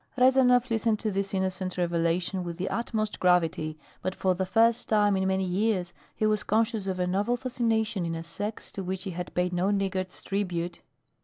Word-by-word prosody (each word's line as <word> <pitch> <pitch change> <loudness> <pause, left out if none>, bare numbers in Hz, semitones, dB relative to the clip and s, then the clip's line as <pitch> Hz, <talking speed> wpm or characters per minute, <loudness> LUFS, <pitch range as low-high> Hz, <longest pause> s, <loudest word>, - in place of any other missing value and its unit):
Rezanov 250 -1 +5
listened 225 -1 +2
to 215 - -1
this 195 0 -1
innocent 190 -1 -2
revelation 175 +1 0
with 170 -1 -5
the 185 +1 -2
utmost 220 -2 -2
gravity, 165 -3 +2 0.2
but 185 0 -2
for 190 -1 +1
the 185 +1 -2
first 225 +4 +3
time 205 -2 +4
in 190 0 +1
many 190 0 +1
years 185 -1 0 0.2
he 215 - 0
was 215 0 +2
conscious 220 -1 +1
of 185 -1 -2
a 180 - +2
novel 200 +7 +1
fascination 230 -5 0
in 165 -1 -2
a 165 - -5
sex 205 +6 -5
to 195 - -5
which 185 0 -3
he 195 - -4
had 180 +1 -5
paid 180 0 +1
no 180 +2 +1
niggard's 190 -2 -1
tribute. 175 -4 -2
190 Hz, 190 wpm, -28 LUFS, 180-220 Hz, 0.2 s, Rezanov